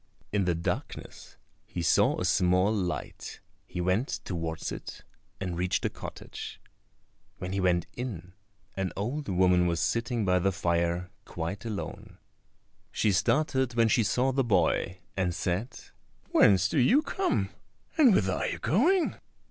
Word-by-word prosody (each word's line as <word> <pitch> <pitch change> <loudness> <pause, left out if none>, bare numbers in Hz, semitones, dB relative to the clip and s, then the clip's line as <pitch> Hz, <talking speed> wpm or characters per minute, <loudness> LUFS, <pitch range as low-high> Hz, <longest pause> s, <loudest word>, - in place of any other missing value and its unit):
In 100 -2 +1
the 90 -1 +1
darkness 85 - -5 0.3
he 85 - -4
saw 80 - +3
a - - -1
small 90 +3 +3
light; 90 -5 -4 0.3
he - - -6
went 95 +9 +1 0.2
towards 80 -3 -3
it - - -8 0.4
and 90 -3 -3
reached 90 +1 0
a - - 0
cottage. - - -8 0.8
When 90 0 -5
he 100 - 0
went 90 -2 +2
in, 95 -8 -6 0.4
an 95 -1 -2
old 125 +7 -3
woman 90 -1 +4
was 85 -1 0
sitting 115 -1 0
by 90 -1 +3
the 95 +2 +2
fire 85 0 0
quite 85 +5 -5
alone. 105 -3 -6 0.7
She 105 - +2
started 130 - +1
when 115 -1 +4
she 115 - +4
saw 125 +7 +1
the 135 +1 +1
boy, 90 -3 +1
and 90 -3 0
said, 95 +8 -2 0.5
"Whence 95 -2 +5
do 145 - 0
you 260 - +5
come, 380 +3 -1 0.4
and 290 -7 +6
whither 95 -2 +2
are - - -1
you - - -3
going?" 330 - +2
95 Hz, 150 wpm, -28 LUFS, 90-120 Hz, 0.8 s, and